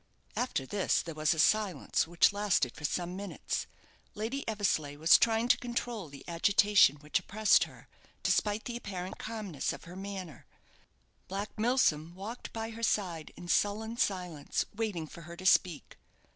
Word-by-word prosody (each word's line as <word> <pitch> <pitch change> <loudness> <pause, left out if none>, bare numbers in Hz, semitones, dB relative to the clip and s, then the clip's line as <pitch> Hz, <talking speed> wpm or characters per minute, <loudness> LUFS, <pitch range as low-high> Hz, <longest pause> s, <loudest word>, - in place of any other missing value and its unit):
After 245 - -1
this 195 +7 +1
there 165 - -6
was 155 +1 +1
a - - -5
silence 190 -4 +2
which 175 +3 +4
lasted 200 - +1
for 150 - -6
some 175 +3 -2
minutes. 200 +1 -4 0.5
Lady 230 +7 -3
Eversleigh 195 -9 0
was 160 +3 +6
trying 225 +1 +2
to - - +5
control 235 -6 -3
the 140 -1 -12
agitation 195 -1 +5
which 150 +1 -1
oppressed 215 +1 +3
her, - - -15 0.4
despite 210 +1 +1
the 240 - -4
apparent 185 -5 -6
calmness 210 -10 -3
of - - -10
her 175 +2 -10
manner. 190 -4 -7 0.8
Black 200 +2 -4
Milsom 195 - +1
walked 215 +6 -7
by 225 0 -4
her 225 +1 -9
side 180 -8 -1
in 175 - -10
sullen 215 +5 +1
silence, 180 -9 -1
waiting 205 -7 -2
for 170 +2 -11
her 170 +1 -10
to 185 - -9
speak. 180 -5 +2
195 Hz, 160 wpm, -31 LUFS, 165-215 Hz, 0.8 s, was